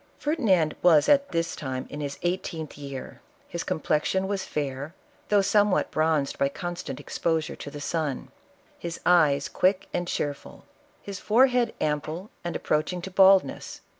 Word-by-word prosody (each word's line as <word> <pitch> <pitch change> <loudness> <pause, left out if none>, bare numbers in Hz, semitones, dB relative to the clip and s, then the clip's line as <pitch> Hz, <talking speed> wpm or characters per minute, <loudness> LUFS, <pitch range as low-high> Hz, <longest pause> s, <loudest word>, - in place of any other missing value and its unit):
" - - -35
Ferdinand 205 - +1
was 160 -4 +5
at 280 -1 +4
this 165 -1 -1
time 130 -2 -4
in 150 - -7
his 140 -1 -4
eighteenth 175 -3 -3
year. 140 -2 -8 0.3
His 170 - -4
complexion 160 +5 0
was 195 -1 -2
fair, 145 +2 -4 0.3
though 205 -1 +4
somewhat 205 0 +2
bronzed 155 -3 +1
by 140 - +2
constant 175 -2 -5
exposure 160 -2 -1
to - - -7
the 145 - -8
sun; 150 -2 -2 0.5
his 170 -1 -5
eyes 150 -6 +4
quick 185 +1 +1
and 175 0 -1
cheerful; 145 -4 -4 0.4
his 200 -1 -6
forehead 245 +1 +3
ample 155 +6 -2
and 175 - -4
approaching 155 +4 0
to 190 - -6
bald 190 0 +7
ness. - - -8
170 Hz, 155 wpm, -26 LUFS, 150-190 Hz, 0.5 s, bald